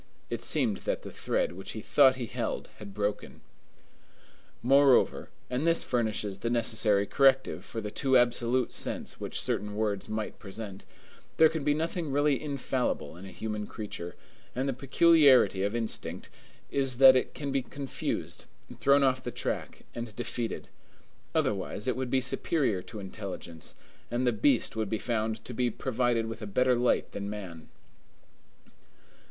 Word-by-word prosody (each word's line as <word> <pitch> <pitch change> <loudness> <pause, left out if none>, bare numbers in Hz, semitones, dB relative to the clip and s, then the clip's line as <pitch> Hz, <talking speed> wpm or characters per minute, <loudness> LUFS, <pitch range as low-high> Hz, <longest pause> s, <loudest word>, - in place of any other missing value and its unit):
It - - -3
seemed - - +1
that - - -3
the - - -8
thread - - -1
which - - -7
he - - -6
thought 135 -3 +5
he 125 -2 -4
held 110 - -4
had 105 -2 -9
broken. 105 +1 -3 1.2
Moreover, 135 +1 +4 0.2
and 130 +6 -1
this 165 0 +4
furnishes 110 -5 -1
the 115 - -2
necessary 110 -3 +3
corrective 135 +2 +3
for 115 - -6
the 105 -1 -5
too 130 +4 +3
absolute 120 0 +2
sense - - -1
which - - -3
certain 105 0 -1
words 105 -2 -1
might 110 0 -4
present, 100 -1 -8 0.5
there 160 - +7
can 160 -2 -4
be 145 0 +2
nothing 165 -1 -2
really 145 -1 +2
infallible 130 - -2
in 95 +3 -10
a - - -10
human 105 +2 -4
creature, 90 -5 -7 0.4
and 130 +2 -1
the 135 - 0
peculiarity 135 - +5
of 100 +3 -1
instinct 115 -2 -3 0.4
is 135 -3 0
that 130 0 +9
it 130 - 0
can 140 -2 -4
become 135 -2 -2
confused, 140 -1 -4 0.3
thrown 140 +1 +4
off 130 -1 +2
the - - -3
track, - - -4
and 115 -3 -6
defeated. 115 0 -3 0.7
Otherwise, 100 +3 -1
it 130 - +1
would 130 -1 -3
be 130 +1 +2
superior 130 - 0
to 110 - -10
intelligence, 95 -4 -7 0.3
and 120 +2 -1
the 120 - +3
beast 120 +4 +2
would 110 -2 -2
be 110 - 0
found 110 -1 -2
to 125 - -7
be 125 +1 +1
provided 120 0 0
with 115 0 -6
a 105 - -5
better 125 +6 +2
light 125 0 +1
than 100 0 -5
man. 90 -6 -8
120 Hz, 160 wpm, -29 LUFS, 105-135 Hz, 1.2 s, that